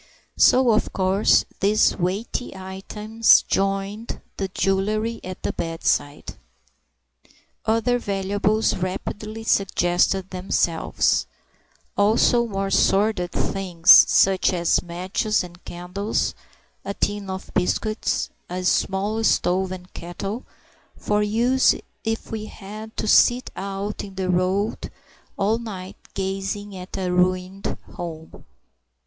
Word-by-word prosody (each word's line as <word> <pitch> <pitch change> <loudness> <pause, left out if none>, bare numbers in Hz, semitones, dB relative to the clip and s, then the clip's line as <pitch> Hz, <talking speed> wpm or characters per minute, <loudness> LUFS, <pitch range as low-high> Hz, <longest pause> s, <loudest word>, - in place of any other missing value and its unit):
So 255 -2 +5
of 215 - +1
course 190 +2 +3
these 210 +2 +3
weighty 195 +5 -3
items 210 +4 +2
joined 195 +3 -2 0.2
the 195 - -1
jewellery 210 +4 0
at 185 0 -8
the - - -1
bedside. 165 -3 -2 1.3
Other 230 +2 +2
valuables 205 +1 0
rapidly 210 +4 -5
suggested 190 -2 +1
themselves; 180 -3 0 0.7
also 230 +3 +3
more 195 -2 -3
sordid 195 -4 +2
things, 180 -4 +2
such 190 0 +6
as 170 -2 +2
matches 185 +5 -1
and 175 0 -12
candles, 180 +5 -2 0.5
a 200 0 -5
tin 205 -1 -2
of 190 0 -6
biscuits, 215 +4 -1 0.2
and 180 +1 -3
a - - -5
small 200 +4 0
stove 185 -3 +2
and 185 0 -9
kettle, 195 +7 -6 0.5
for 210 0 0
use 235 +5 +3 0.3
if 225 0 -3
we 220 -1 -4
had 215 +2 -10
to - - -2
sit 245 +3 +4
out 195 +1 -4
in 195 -2 -10
the 185 -1 -1
road 185 +4 0 0.5
all 210 +3 +1
night 195 -5 -7 0.2
gazing 195 +1 -3
at 185 +1 -7
a 185 -2 -1
ruined 185 +2 0 0.2
home. 160 -2 -8
195 Hz, 110 wpm, -23 LUFS, 185-215 Hz, 1.3 s, such